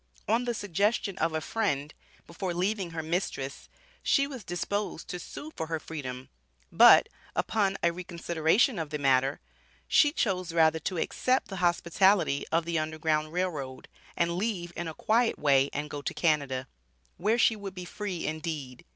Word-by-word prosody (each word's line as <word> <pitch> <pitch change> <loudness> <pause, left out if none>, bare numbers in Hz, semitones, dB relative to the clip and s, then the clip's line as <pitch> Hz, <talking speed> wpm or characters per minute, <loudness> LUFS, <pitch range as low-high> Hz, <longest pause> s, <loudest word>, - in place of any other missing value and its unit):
On 230 +3 +2
the 240 -1 -1
suggestion 205 +1 0
of 160 0 +1
a 160 - -1
friend, 150 -9 -1 0.3
before 175 +1 -4
leaving 190 +1 0
her 160 -1 -5
mistress, 155 -5 -3 0.3
she 275 - +3
was 265 -6 -7
disposed 180 +1 -3
to 180 - -4
sue 300 - -8
for 160 - -4
her 160 -1 -2
freedom, 130 -5 -7 0.4
but, - - +8 0.3
upon 200 -3 +1
a 170 - +4
reconsideration 175 - +1
of 160 -2 -3
the 150 - -3
matter, 135 0 +2 0.5
she 300 -2 +5
chose 185 - -1
rather 160 -1 +4
to 180 +3 -3
accept 255 +9 0
the 195 - -5
hospitality 175 -2 +2
of 165 0 +2
the 170 -1 0
Underground 155 0 -1
Rail 180 +2 0
Road, 135 -4 -7 0.3
and 170 0 +1
leave 180 -4 -2
in 175 - -4
a 160 - -6
quiet 230 +2 +2
way 140 -1 +3
and 145 +1 -3
go 145 -1 -6
to - - -4
Canada, 140 -6 0 0.5
where 215 +6 +2
she 225 -1 +4
would 200 -2 -7
be 180 -1 -6
free 185 -1 -4
indeed. 155 -5 -4
170 Hz, 170 wpm, -29 LUFS, 155-200 Hz, 0.5 s, but